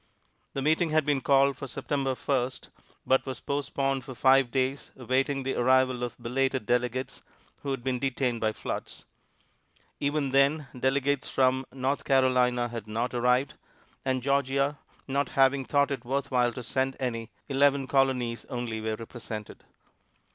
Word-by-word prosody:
The 135 Hz, -, -2 dB
meeting 160 Hz, +3 st, +2 dB
had 155 Hz, -1 st, +2 dB
been 145 Hz, -2 st, +1 dB
called 140 Hz, 0 st, +4 dB
for 140 Hz, -, -6 dB
September 135 Hz, +1 st, -2 dB
First, 130 Hz, -1 st, -2 dB, 0.4 s
but 130 Hz, 0 st, +3 dB
was 130 Hz, -2 st, -6 dB
postponed 135 Hz, -1 st, -1 dB
for 130 Hz, 0 st, -9 dB
five 135 Hz, 0 st, +4 dB
days 130 Hz, +2 st, -1 dB
awaiting 135 Hz, +2 st, 0 dB
the 135 Hz, -, -1 dB
arrival 130 Hz, 0 st, +3 dB
of 120 Hz, -, -4 dB
belated 130 Hz, 0 st, -1 dB
delegates 125 Hz, +2 st, -1 dB, 0.4 s
who 140 Hz, -, -5 dB
had 135 Hz, -3 st, -3 dB
been 130 Hz, -1 st, -1 dB
detained 125 Hz, -3 st, -1 dB
by 110 Hz, -1 st, +2 dB
floods. -, -, -6 dB, 0.9 s
Even 145 Hz, -1 st, 0 dB
then, 140 Hz, +2 st, +3 dB
delegates 135 Hz, +2 st, 0 dB
from 130 Hz, 0 st, +2 dB
North 135 Hz, +2 st, -1 dB
Carolina 125 Hz, -2 st, +3 dB
had 115 Hz, -3 st, -6 dB
not 115 Hz, +4 st, -2 dB
arrived, 125 Hz, +2 st, +2 dB, 0.5 s
and 130 Hz, -2 st, -1 dB
Georgia 140 Hz, +1 st, +1 dB, 0.3 s
not 140 Hz, +1 st, 0 dB
having 135 Hz, 0 st, +3 dB
thought 140 Hz, +1 st, +2 dB
it 135 Hz, -3 st, -3 dB
worth 135 Hz, +3 st, -2 dB
while 125 Hz, -1 st, +3 dB
to 125 Hz, -, -6 dB
send 130 Hz, +3 st, -1 dB
any, 115 Hz, -3 st, -3 dB, 0.2 s
eleven 140 Hz, 0 st, +3 dB
Colonies 130 Hz, -3 st, +1 dB
only 120 Hz, -4 st, -4 dB
were 110 Hz, 0 st, -2 dB
represented. 110 Hz, -2 st, -8 dB
130 Hz, 150 wpm, -28 LUFS, 125-140 Hz, 0.9 s, called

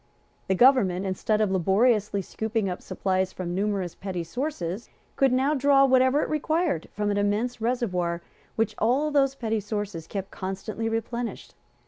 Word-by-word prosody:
The 190 Hz, -, +2 dB
government, 200 Hz, -6 st, +4 dB
instead 210 Hz, +3 st, 0 dB
of 210 Hz, -3 st, +2 dB
laboriously 200 Hz, +2 st, +2 dB
scooping 220 Hz, +1 st, -2 dB
up 180 Hz, -1 st, -4 dB
supplies 190 Hz, -1 st, -1 dB
from 175 Hz, -2 st, -5 dB
numerous 195 Hz, -2 st, -1 dB
petty 185 Hz, -3 st, -4 dB
sources, 215 Hz, -, -4 dB, 0.3 s
could 270 Hz, -2 st, +3 dB
now 265 Hz, +4 st, +2 dB
draw 275 Hz, -1 st, +5 dB
whatever 260 Hz, +2 st, +4 dB
it -, -, -3 dB
required 310 Hz, -, 0 dB
from 210 Hz, 0 st, -1 dB
an 205 Hz, -, 0 dB
immense 215 Hz, +4 st, 0 dB
reservoir, 180 Hz, -8 st, -1 dB, 0.3 s
which 225 Hz, -1 st, 0 dB
all 270 Hz, +7 st, +2 dB
those 275 Hz, -2 st, +2 dB
petty 225 Hz, -4 st, -1 dB
sources 205 Hz, -5 st, -4 dB
kept 195 Hz, -1 st, -5 dB
constantly 200 Hz, +4 st, -4 dB
replenished. 230 Hz, +1 st, -4 dB
215 Hz, 150 wpm, -26 LUFS, 190-255 Hz, 0.3 s, draw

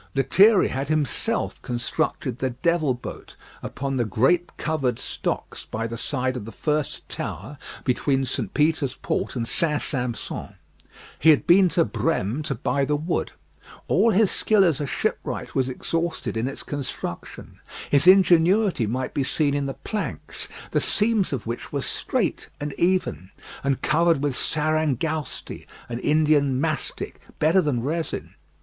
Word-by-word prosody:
Lethierry 190 Hz, -, +5 dB
had 135 Hz, +1 st, -3 dB
himself 155 Hz, -4 st, -1 dB
constructed 125 Hz, +1 st, -2 dB
the 130 Hz, -, 0 dB
"Devil 155 Hz, +1 st, +1 dB
Boat" 120 Hz, -, -9 dB, 0.3 s
upon 135 Hz, 0 st, -3 dB
the 120 Hz, -, +2 dB
great 135 Hz, -, +1 dB
covered 135 Hz, -7 st, -1 dB
stocks -, -, -4 dB
by 115 Hz, +1 st, -4 dB
the 115 Hz, 0 st, -4 dB
side 130 Hz, +2 st, -1 dB
of 120 Hz, -5 st, -5 dB
the 115 Hz, -, -8 dB
first 150 Hz, +5 st, -2 dB
tower 145 Hz, -1 st, -6 dB, 0.2 s
between 135 Hz, +1 st, +1 dB
St. 125 Hz, -6 st, -3 dB
Peter's 150 Hz, -3 st, +1 dB
Port -, -, -2 dB
and 115 Hz, -2 st, -2 dB
St. 150 Hz, +1 st, +1 dB
Sampson. 125 Hz, -4 st, -3 dB, 0.6 s
He 160 Hz, -, +5 dB
had 155 Hz, -, +5 dB
been 185 Hz, +1 st, +6 dB
to 170 Hz, -1 st, +2 dB
Brême 145 Hz, -, -1 dB
to 135 Hz, -, -1 dB
buy 140 Hz, +5 st, 0 dB
the 150 Hz, +2 st, +1 dB
wood. 160 Hz, +4 st, -2 dB, 0.5 s
All 230 Hz, -, +4 dB
his 215 Hz, -1 st, +4 dB
skill 215 Hz, -2 st, +3 dB
as 160 Hz, -6 st, +2 dB
a 145 Hz, -, -2 dB
shipwright -, -, -3 dB
was 130 Hz, -1 st, +1 dB
exhausted 165 Hz, +4 st, -2 dB
in 115 Hz, +3 st, 0 dB
its 135 Hz, -, -6 dB
construction; 135 Hz, -11 st, -6 dB, 0.3 s
his 145 Hz, +4 st, +4 dB
ingenuity 185 Hz, -, +5 dB
might 125 Hz, +4 st, -2 dB
be 140 Hz, -, 0 dB
seen 145 Hz, +2 st, +1 dB
in 140 Hz, -1 st, -1 dB
the 135 Hz, -, -4 dB
planks, 205 Hz, +10 st, -4 dB, 0.2 s
the -, -, +2 dB
seams 210 Hz, -2 st, +2 dB
of 130 Hz, -5 st, -3 dB
which 115 Hz, +1 st, -5 dB
were -, -, -2 dB
straight -, -, -1 dB
and 145 Hz, -1 st, -4 dB
even, 170 Hz, -, 0 dB, 0.3 s
and 135 Hz, -1 st, 0 dB
covered 165 Hz, -2 st, +3 dB
with 145 Hz, -2 st, +1 dB
sarangousti, 155 Hz, -1 st, -1 dB, 0.2 s
an 120 Hz, 0 st, -3 dB
Indian 150 Hz, -2 st, +3 dB
mastic, 155 Hz, 0 st, -3 dB, 0.2 s
better 165 Hz, +5 st, +4 dB
than 130 Hz, -8 st, -1 dB
resin. 160 Hz, +4 st, -3 dB
145 Hz, 150 wpm, -24 LUFS, 130-165 Hz, 0.6 s, been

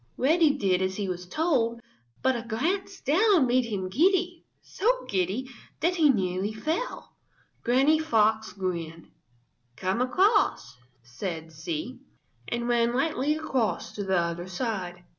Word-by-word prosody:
Reddy 305 Hz, +1 st, +3 dB
did 190 Hz, -5 st, +1 dB
as 190 Hz, 0 st, -1 dB
he 200 Hz, -1 st, -3 dB
was 180 Hz, -1 st, -5 dB
told, 235 Hz, -, 0 dB, 0.4 s
but 260 Hz, 0 st, +3 dB
a 235 Hz, -, -3 dB
glance 340 Hz, -, -2 dB
down 355 Hz, -, +4 dB
made 250 Hz, 0 st, +2 dB
him 200 Hz, -5 st, -3 dB
giddy, 350 Hz, -, +1 dB
so -, -, -1 dB
giddy 195 Hz, +7 st, -1 dB, 0.3 s
that 355 Hz, +3 st, +1 dB
he 310 Hz, -3 st, +5 dB
nearly 190 Hz, -3 st, 0 dB
fell. 320 Hz, -, -4 dB, 0.5 s
Granny 270 Hz, +6 st, +4 dB
Fox 220 Hz, -7 st, +2 dB
grinned. 170 Hz, -4 st, -5 dB, 0.7 s
"Come 185 Hz, -, -1 dB
across," 255 Hz, -, +2 dB, 0.3 s
said 160 Hz, +6 st, -6 dB
she, 160 Hz, +10 st, -5 dB, 0.5 s
and 235 Hz, 0 st, -2 dB
ran 235 Hz, 0 st, +2 dB
lightly 295 Hz, +1 st, +1 dB
across 265 Hz, -7 st, -1 dB
to 205 Hz, -, -5 dB
the 190 Hz, -1 st, +1 dB
other 170 Hz, +1 st, -2 dB
side. 185 Hz, -3 st, -4 dB
235 Hz, 135 wpm, -27 LUFS, 185-310 Hz, 0.7 s, he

